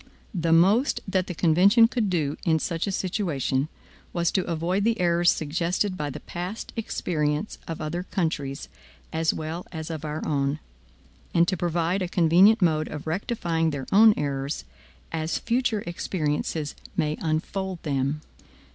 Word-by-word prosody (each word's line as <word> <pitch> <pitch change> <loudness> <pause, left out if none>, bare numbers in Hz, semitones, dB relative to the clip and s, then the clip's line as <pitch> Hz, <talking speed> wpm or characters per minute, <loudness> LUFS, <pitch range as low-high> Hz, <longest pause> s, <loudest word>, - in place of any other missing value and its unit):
The 170 -3 0
most 195 - +4
that 190 -1 0
the 180 - -5
convention 190 +8 +5
could 230 -3 -1
do 155 -5 0
in 160 -2 +3
such 165 +3 -2
a - - 0
situation, 165 - -1 0.5
was 170 -2 +1
to 190 - +1
avoid 175 +4 0
the 230 +1 +1
errors 175 -1 +3
suggested 170 +5 0
by 150 -4 -3
the 135 - -7
past 180 +5 -6
experience 160 -5 -2
of 165 - -5
other 155 +3 -3
countries, 155 -7 -2 0.5
as 160 0 +2
well 160 +3 -5
as 160 -1 -5
of 155 -2 -5
our 155 0 -4
own; 140 -1 0 0.8
and 170 0 +5
to 185 - +1
provide 175 +2 0
a 180 - 0
convenient 185 +5 +5
mode 155 -2 +2
of 150 - -7
rectifying 165 -2 -1
their 140 -3 -4
own 215 +2 +7
errors, 140 0 -2 0.5
as 160 0 -1
future 235 -3 0
experiences 155 -3 -2 0.2
may 150 0 +1
unfold 175 +3 -2
them. 140 0 -1
170 Hz, 150 wpm, -26 LUFS, 155-190 Hz, 0.8 s, own